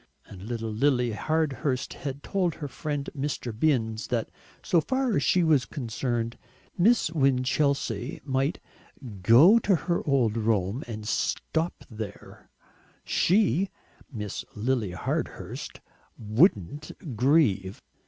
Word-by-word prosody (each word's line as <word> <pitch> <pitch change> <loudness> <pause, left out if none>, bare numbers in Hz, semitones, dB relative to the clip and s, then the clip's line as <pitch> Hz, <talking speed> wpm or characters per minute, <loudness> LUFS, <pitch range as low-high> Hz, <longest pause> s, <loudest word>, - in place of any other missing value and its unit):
And 95 - -12
little 115 +1 -4
Lily 125 +1 +2
Hardhurst 140 0 -1
had 140 0 -6
told 180 -5 0
her 145 - -5
friend 145 0 -4
Mr. 135 -4 -3
Binns 115 -5 0
that 115 -3 -2 0.3
so 170 - +3
far 260 - 0
as - - +2
she 180 - +3
was 150 -6 +3
concerned 120 -3 -3 0.4
Miss 210 -2 +3
Winchelsea 135 - +1
might 135 +3 0 0.6
"go 145 - +7
to 205 -3 +2
her 170 +1 -1
old 120 -6 +2
Rome 110 +1 0
and 110 -2 -6
stop 160 +8 -1
there; 110 -3 -9 0.5
SHE 195 0 +2 0.4
(Miss 105 -6 -5
Lily 110 -3 -1
Hardhurst) 90 - -4 0.4
wouldn't 130 - 0
grieve." 110 -7 +2
130 Hz, 115 wpm, -27 LUFS, 110-155 Hz, 0.6 s, go